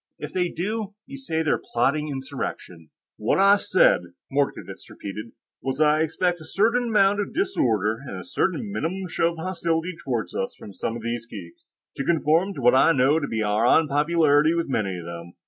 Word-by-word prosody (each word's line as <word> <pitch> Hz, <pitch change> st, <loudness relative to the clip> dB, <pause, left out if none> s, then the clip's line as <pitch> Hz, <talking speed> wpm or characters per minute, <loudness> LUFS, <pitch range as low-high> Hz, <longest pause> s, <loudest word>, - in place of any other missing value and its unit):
If -, -, -7 dB
they 180 Hz, -1 st, 0 dB
do, 210 Hz, +4 st, -4 dB
you 275 Hz, 0 st, -9 dB
say 160 Hz, -12 st, -2 dB
they're 155 Hz, -, +1 dB
plotting 140 Hz, +6 st, +1 dB
insurrection." 90 Hz, -, -6 dB, 0.3 s
"What 110 Hz, -, +1 dB
I 200 Hz, +1 st, +6 dB
said," -, -, +4 dB, 0.3 s
Mordkovitz 140 Hz, 0 st, -2 dB
repeated, 105 Hz, +3 st, -8 dB, 0.3 s
"was 135 Hz, 0 st, -3 dB
that 155 Hz, 0 st, +4 dB
I 155 Hz, -, +1 dB
expect 175 Hz, +2 st, 0 dB
a -, -, -10 dB
certain 230 Hz, +8 st, +1 dB
amount 205 Hz, -2 st, +3 dB
of 205 Hz, -, -3 dB
disorder, 115 Hz, -, +1 dB
and 95 Hz, -, -6 dB
a -, -, -8 dB
certain 195 Hz, +3 st, -1 dB
minimum 185 Hz, +1 st, -3 dB
show 165 Hz, +1 st, +1 dB
of -, -, -13 dB
hostility 170 Hz, 0 st, -2 dB
toward 120 Hz, -5 st, -2 dB
us 95 Hz, -, -3 dB
from 100 Hz, -, -11 dB
some 115 Hz, -, -3 dB
of 115 Hz, -, -10 dB
these 115 Hz, 0 st, -3 dB
geeks, 90 Hz, -7 st, -11 dB, 0.3 s
to 135 Hz, -, -1 dB
conform 165 Hz, +5 st, +2 dB
to -, -, -6 dB
what 125 Hz, 0 st, +5 dB
I 150 Hz, +5 st, +5 dB
know 140 Hz, +3 st, +3 dB
to 140 Hz, -, -3 dB
be 110 Hz, -1 st, -2 dB
our 105 Hz, +3 st, +2 dB
unpopularity 150 Hz, +1 st, +3 dB
with 170 Hz, -1 st, -1 dB
many 100 Hz, -8 st, -1 dB
of 85 Hz, -, -8 dB
them. 85 Hz, 0 st, -8 dB
155 Hz, 195 wpm, -24 LUFS, 115-185 Hz, 0.3 s, I